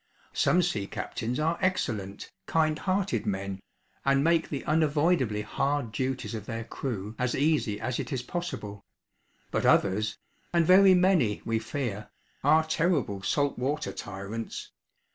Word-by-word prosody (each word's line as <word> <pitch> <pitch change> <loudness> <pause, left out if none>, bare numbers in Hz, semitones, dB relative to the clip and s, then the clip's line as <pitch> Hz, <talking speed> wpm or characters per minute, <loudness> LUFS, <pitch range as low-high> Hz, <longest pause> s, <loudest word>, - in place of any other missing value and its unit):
Some 180 0 +3
sea 105 - -1
captains 120 +5 -3
are 165 +2 0
excellent, 110 - -2 0.2
kind 155 -1 +2
hearted 195 +1 0
men, 95 -1 -2 0.4
and 140 0 +3
make 165 0 +2
the 140 - -4
unavoidably 150 -7 +2
hard 135 +2 -1
duties 130 +1 -2
of 105 -2 -6
their 115 0 -4
crew 110 -3 -5
as 125 -1 0
easy 140 -8 +1
as 130 +2 -2
it - - -4
is 130 -3 -2
possible; 105 - -5 0.7
but - - 0
others 105 +2 +3 0.4
and 170 -1 +4
very 190 +2 +7
many 180 - +3
we 115 0 +1
fear 110 -5 -4 0.3
are 155 +3 +5
terrible 155 - 0
salt 140 +8 0
water 145 +4 -1
tyrants. 100 +3 -6
135 Hz, 140 wpm, -28 LUFS, 105-160 Hz, 0.7 s, very